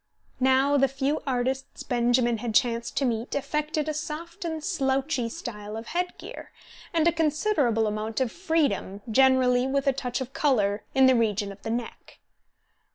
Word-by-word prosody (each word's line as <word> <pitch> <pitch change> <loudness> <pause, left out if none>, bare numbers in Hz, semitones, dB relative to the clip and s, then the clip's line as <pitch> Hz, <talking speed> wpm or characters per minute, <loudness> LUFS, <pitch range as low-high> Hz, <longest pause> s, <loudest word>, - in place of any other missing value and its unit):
Now 265 +2 +4
the 275 0 +4
few 270 +3 -1
artists 260 +1 -2
Benjamin 240 -1 +2
had 230 -2 -4
chanced 235 0 +1
to 275 - +2
meet 235 +1 -2
affected 300 +2 -1
a 310 - -1
soft 325 +3 -6
and 320 -2 -4
slouchy 270 - 0
style 210 -2 -7
of 225 - -7
head 355 +1 -2
gear, - - -9 0.4
and 330 -1 +2
a - - +5
considerable 305 - +1
amount 215 +2 -2
of 255 -4 0
freedom, 295 - -1
generally 260 0 +4
with 275 +1 0
a 275 - +3
touch 250 -2 -3
of 260 0 -6
colour, 215 -9 +1
in 265 0 +6
the 260 - +6
region 210 -4 +1
of 195 - -13
the 225 - -5
neck. 235 0 -5
260 Hz, 165 wpm, -26 LUFS, 230-295 Hz, 0.4 s, in